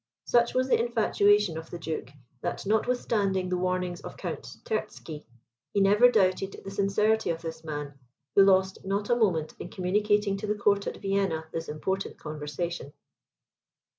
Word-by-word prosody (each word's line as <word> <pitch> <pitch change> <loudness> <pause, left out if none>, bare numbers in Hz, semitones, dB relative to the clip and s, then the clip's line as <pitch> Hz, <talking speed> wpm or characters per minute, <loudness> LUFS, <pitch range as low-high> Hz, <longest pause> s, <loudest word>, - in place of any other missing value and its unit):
Such 235 -1 +3
was 255 0 +2
the - - +3
infatuation 205 -6 +3
of 160 - -11
the 175 - -6
Duke, 160 -5 -4 0.3
that - - -3
notwithstanding 205 -4 +1
the 180 - 0
warnings 180 -1 -1
of - - -9
Count - - -5 0.2
Terzky, 160 - -4 0.5
he - - +4
never 205 +5 +6
doubted 195 -3 +1
the 195 - -6
sincerity 205 +2 +2
of 165 0 -2
this 160 -1 -6
man, 145 -3 -6 0.3
who 195 - +7
lost 190 -1 +3
not 200 +3 -1
a - - +5
moment 170 -10 +1
in - - -6
communicating 205 +2 +1
to 210 +2 -5
the 210 - +1
court 200 -1 +2
at - - -4
Vienna 195 -5 0
this 165 0 -4
important 190 +6 -3
conversation. 150 +1 -5
195 Hz, 160 wpm, -28 LUFS, 165-210 Hz, 0.5 s, who